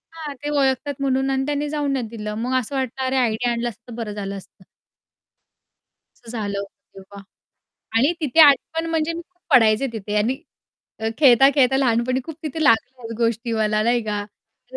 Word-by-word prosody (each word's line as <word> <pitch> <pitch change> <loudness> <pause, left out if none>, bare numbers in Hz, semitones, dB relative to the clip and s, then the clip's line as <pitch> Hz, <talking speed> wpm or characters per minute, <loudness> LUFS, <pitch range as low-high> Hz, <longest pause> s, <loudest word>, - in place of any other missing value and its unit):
हां, 310 -3 -6
ते 290 - -3
ओळखतात 285 0 +1
म्हणून 270 0 +1
आणि 270 0 0
त्यांनी 295 0 -2
जाऊन 290 -1 -1
नाही 250 -4 -2
दिलं. 210 -1 -6
मग 250 +2 -2
असं 255 +3 -6
वाटलं, 265 0 -2
"अरे 260 +1 -1
आयडी 245 -1 +1
आणला 240 0 -1
असता 230 +1 -16
तर - - -7
बरं 220 -3 -4
झालं 200 -1 -5
असतं." 195 0 -15 1.6
असं 235 - -13
झालं 205 -2 -3
होतं 200 0 -11
तेव्हा. 200 +1 -12 0.8
आणि 275 +8 +3
तिथे 300 +1 +2
आजपण 315 +3 +5
म्हणजे, 325 0 0
मी 335 - -5
खूप 355 0 -43
पडायचे 225 +2 +5
तिथे 210 -1 -4
आणि 250 +8 0 0.6
अ, 220 - -1
खेळता, 270 -2 +7
खेळता 265 -2 +4
लहानपणी 255 0 +1
खूप 320 - -7
तिथे 315 +1 -3
लागल्या 240 -2 +1
गोष्टी 230 0 0
मला 215 -1 +1
नाही 235 +1 +2
का 210 -1 -2
मी 245 +5 -15
245 Hz, 185 wpm, -22 LUFS, 220-275 Hz, 1.6 s, खेळता